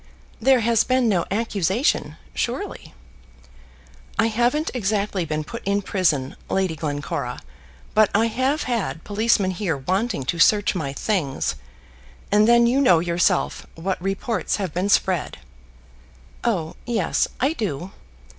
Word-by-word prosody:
"There 255 +2 +4
has 230 -1 +3
been 255 -1 +2
no 185 -6 +1
accusation, 200 - 0 0.2
surely?" - - -4 1.2
"I 225 +2 +3
haven't 245 +8 +1
exactly 205 -5 -1
been 155 0 -2
put 235 +9 -8
in 200 +1 0
prison, 155 -10 0
Lady 190 -4 0
Glencora, 145 -5 -3 0.5
but 215 -1 +5
I 220 +2 +4
have 260 +6 0
had 185 - -2
policemen 205 -2 +1
here 180 -5 -2
wanting 185 - -1
to 170 +5 -2
search 205 +4 +4
my 155 -8 -3
things; 140 - -1 0.8
and 210 +1 +5
then 235 0 +6
you 255 +4 +3
know 185 -11 +6
yourself 170 +1 0
what 185 +2 -3
reports 195 +4 -1
have 190 -7 -3
been 185 +3 -1
spread." 185 -4 +1 1.1
"Oh, 175 -9 -1
yes; 225 -8 +1
I 270 +6 +2
do. 190 - -4
200 Hz, 130 wpm, -23 LUFS, 170-230 Hz, 1.2 s, then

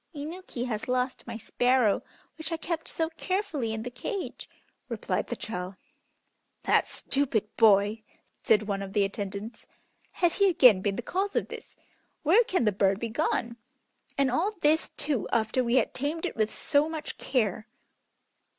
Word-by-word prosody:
"Inuki 300 -4 -5
has 220 -4 -3
lost 255 0 -1
my 230 -2 -5
sparrow, 245 0 +2 0.3
which 320 +1 -5
I 330 - -1
kept 330 0 -3
so 325 0 -1
carefully 365 - -1
in 220 0 -3
the 245 - -5
cage," 370 - -5 0.4
replied - - -2
the - - -3
child. 185 -3 -5 0.9
"That - - +3
stupid 250 -7 -1
boy," 210 0 +4 0.4
said 215 -1 +4
one 200 -1 -2
of 195 -1 -6
the 205 - +3
attendants. 200 +3 -5 0.5
"Has 345 -2 +1
he 400 -1 +5
again 250 - +6
been 200 0 0
the 240 - -4
cause 390 - -2
of - - 0
this? - - -10 0.5
Where 365 +11 +6
can 365 - +1
the 210 - +4
bird 195 0 +2
be 230 - -3
gone? 235 -2 -1 0.6
And 275 -2 +3
all 365 - +1
this, 310 +2 +3
too, 285 -7 -1
after 230 +3 +1
we 235 +1 +1
had 260 - +2
tamed 305 +6 -2
it - - -3
with 215 -1 +1
so 300 0 +1
much 315 -2 -6
care." 220 -4 0
245 Hz, 165 wpm, -28 LUFS, 215-315 Hz, 0.9 s, again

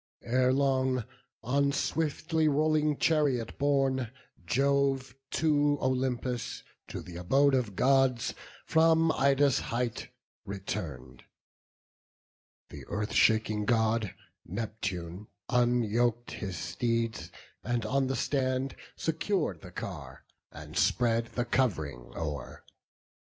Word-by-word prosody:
Ere 125 +2 +2
long, 130 -2 +2 0.4
on 140 +4 +2
swiftly 160 +2 0
rolling 150 0 +2
chariot 140 -8 +1
borne, 135 -3 +1 0.4
Jove 135 +1 +1 0.2
to 145 -2 +2
Olympus, 125 -2 -1 0.2
to - - -6
th' 90 - -10
abode 135 +11 +3
of 120 -7 0
Gods, 135 -1 +3 0.3
From 160 0 +4
Ida's 140 -1 +3
height 120 -1 -3 0.3
return'd: 75 - -6 1.5
th' - - -9
earth 105 +1 -3
shaking 110 -1 +3
God, 110 -2 +1 0.3
Neptune, 100 -4 -5 0.2
unyok'd 120 -1 +1
his 95 -5 -5
steeds; 115 +6 -2 0.3
and 120 -1 -1
on 135 +4 +1
the 135 - -1
stand 130 -1 0 0.2
Secur'd 160 - -1
the - - -10
car, - - -7 0.3
and 75 +1 -10
spread 115 +5 +2
the 120 - -1
cov'ring 80 - -1
o'er. 75 -6 -5
125 Hz, 100 wpm, -30 LUFS, 110-140 Hz, 1.5 s, From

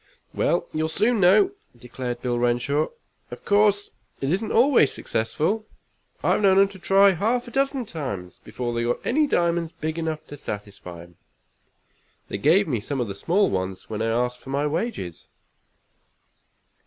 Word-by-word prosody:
"Well, - - 0
you'll 155 0 0
soon 215 +8 +1
know," 200 - +5 0.3
declared 125 -1 -6
Bill 120 -1 0
Renshaw. 120 +5 +1 0.4
"Of - - -10
course 205 0 +3 0.3
it 135 +1 -1
isn't 195 +5 -1
always 245 - +4
successful. 160 - -2 0.6
I've - - +2
known 195 -2 +5
'em 195 0 +5
to 195 -1 -13
try 195 +2 +5
half 230 +7 0
a - - -9
dozen 275 -1 0
times 115 - -6
before 120 -1 -4
they 120 - -1
got 120 +1 -2
any 300 +4 +2
diamonds 170 - 0
big 160 +1 -4
enough 160 -1 -3
to 145 - -10
satisfy 100 -8 -8
'em. 85 -1 -19 1.1
They 100 - -4
gave 170 - +4
me 125 -7 -1
some 135 +6 -4
of 120 -4 -2
the - - -3
small 180 - +1
ones 95 +2 -4
when 110 0 -3
I 115 - 0
asked 125 +2 0
for - - -13
my 140 +2 0
wages. 150 - -3
155 Hz, 165 wpm, -24 LUFS, 120-200 Hz, 1.1 s, know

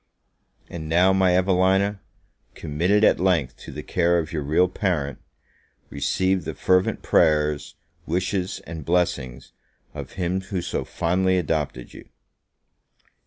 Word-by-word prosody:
And 80 -2 -7
now, 90 +3 +4
my 95 -2 +3
Evelina, 95 +2 +2 0.6
committed 85 +8 0
at - - +4
length 85 -9 +1
to - - -11
the 75 +2 -7
care 85 -1 +1
of 85 0 -3
your 75 - -2
real 80 +6 +2
parent, 90 -7 -2 0.7
receive 95 +5 0
the - - -5
fervent 95 0 +1
prayers, 75 -1 +2 0.3
wishes, 90 +2 -2
and 80 0 -7
blessings, 70 -7 -1 0.4
of - - -8
him 90 +1 -2
who 95 -1 -4
so - - -3
fondly 95 +2 0
adopted 75 -7 -2
you! - - -13
90 Hz, 125 wpm, -23 LUFS, 75-95 Hz, 0.7 s, now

